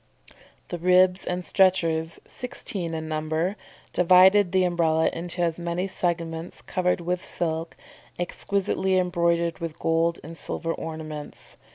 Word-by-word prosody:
The 175 - -4
ribs 180 +1 +4
and 180 0 -2
stretchers, 165 -4 +2
sixteen 200 -9 -5
in 160 0 -4
number, 155 +4 -1 0.4
divided 185 +2 +6
the 185 0 +3
Umbrella 165 -2 +2
into 175 +1 -2
as 165 0 0
many 175 +2 -2
segments, 170 -2 -3
covered 180 -1 0
with 180 +1 -2
silk, 165 -1 -3 0.4
exquisitely 190 +1 0
embroidered 170 -2 +1
with 165 -2 -5
gold 165 +1 +1
and 165 +2 -9
silver 165 0 -3
ornaments. 155 -2 -7
170 Hz, 125 wpm, -25 LUFS, 165-180 Hz, 0.4 s, divided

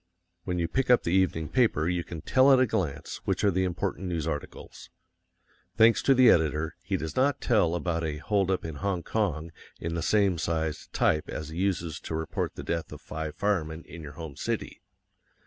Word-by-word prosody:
When 90 -1 -2
you 85 -1 0
pick 130 +7 -1
up 125 - +5
the 85 - -1
evening 90 -4 +2
paper 110 - +2
you 90 -1 0
can 85 -2 -8
tell 130 +1 +5
at 130 - +6
a 130 - +5
glance 80 - -3
which - - 0
are 100 - +4
the 95 +1 +1
important 95 +1 -2
news 85 -4 -2
articles. 75 -3 -6 0.9
Thanks 115 +1 +6
to 135 - +4
the 130 -1 +6
editor, 80 0 +1
he 95 +1 -1
does 80 -2 -5
not 135 +2 +2
tell 100 -8 +2
about 85 -1 -1
a 75 -2 -2
"hold 100 +3 0
up" 95 -3 0
in 80 -3 -5
Hong 95 -2 -2
Kong 85 -7 -1 0.3
in 85 0 -3
the 85 - -2
same 100 -1 +2
sized 80 -2 -2
type 75 - +1
as 75 0 -5
he 80 +2 -6
uses 85 -5 -1
to 80 - -5
report 80 0 -3
the - - -7
death 85 -1 -3
of 75 - -8
five 75 +1 -6
firemen 85 -5 -1
in 85 - -10
your 75 -1 -9
home 80 -2 -8
city. - - -4
85 Hz, 205 wpm, -28 LUFS, 80-100 Hz, 0.9 s, at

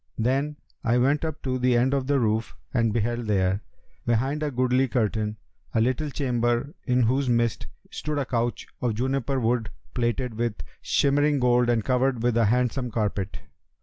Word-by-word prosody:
Then 135 +6 0 0.3
I 120 +1 +2
went 140 +5 +2
up 160 -2 -4
to 130 -1 -1
the 125 -1 +3
end 130 +3 +2
of 135 -2 0
the 140 -1 +3
roof 110 -1 0 0.2
and 115 -3 +2
beheld 120 +1 -1
there, 95 -1 +1 0.4
behind 130 +6 0
a 150 - 0
goodly 130 0 +2
curtain, 110 -3 -1 0.4
a - - +4
little 130 +6 +1
chamber 125 -1 0
in 125 -1 +3
whose 130 +3 +1
midst 120 -1 +1 0.2
stood 150 -1 -3
a 140 - 0
couch 120 -1 -1 0.2
of 120 -3 0
juniper 130 +2 0
wood[FN#285] 115 -1 +1 0.3
plated 120 0 -1
with 120 -2 0 0.3
shimmering 145 +1 +2
gold 125 -1 +3
and 115 -3 +1
covered 130 -2 +1
with 120 -1 +2
a 115 -1 +4
handsome 125 +3 +1
carpet. 105 -3 -2
125 Hz, 170 wpm, -26 LUFS, 115-135 Hz, 0.4 s, a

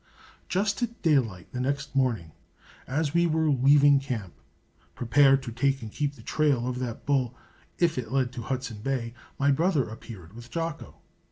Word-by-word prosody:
Just 200 +3 0
at 235 -1 -3
daylight 120 - +1
the 125 - -4
next 140 +2 -2
morning, 115 -12 +1 0.6
as 145 +2 -1
we 170 0 +4
were 160 -1 +2
leaving 140 +1 +5
camp, 120 -9 -5 0.6
prepared 135 +2 +4
to 120 - -5
take 135 +2 0
and 110 - -7
keep 145 +2 -2
the 115 - -14
trail 140 -2 +1
of 125 0 -3
that 120 -3 -5
bull 130 -4 +1 0.4
if 170 -6 +2
it 115 -2 -6
led 130 -2 +1
to 120 - -5
Hudson 125 -2 -4
Bay, 120 -2 -2 0.2
my 140 +1 +3
brother 155 -1 +2
appeared 105 -5 -10
with 120 +1 -11
Jocko. 165 +1 -4
135 Hz, 170 wpm, -27 LUFS, 120-145 Hz, 0.6 s, leaving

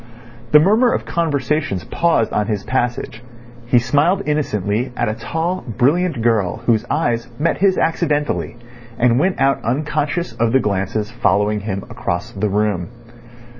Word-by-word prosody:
The 150 - +8
murmur 215 +9 +4
of - - -2
conversations 145 - -1
paused 165 -10 +1
on 105 -1 0
his 105 -3 -2
passage. 120 -2 -2 0.5
He 125 - +4
smiled 145 +11 +2
innocently 125 -5 -1
at 120 - 0
a 110 - 0
tall, 165 +10 -3
brilliant 150 -1 +1
girl, 110 -6 +1
whose 115 -1 +2
eyes 120 -6 0
met 165 +3 0
his 195 -1 +3
accidentally, 150 -6 0 0.4
and 120 0 +3
went 185 +5 +1
out 135 0 +2
unconscious 150 +6 -1
of 115 0 0
the 135 - +5
glances 105 +1 -2
following 105 -2 +1
him 100 -2 -4
across 85 0 -4
the 105 +1 -2
room. 100 -3 0
120 Hz, 145 wpm, -19 LUFS, 105-150 Hz, 0.5 s, The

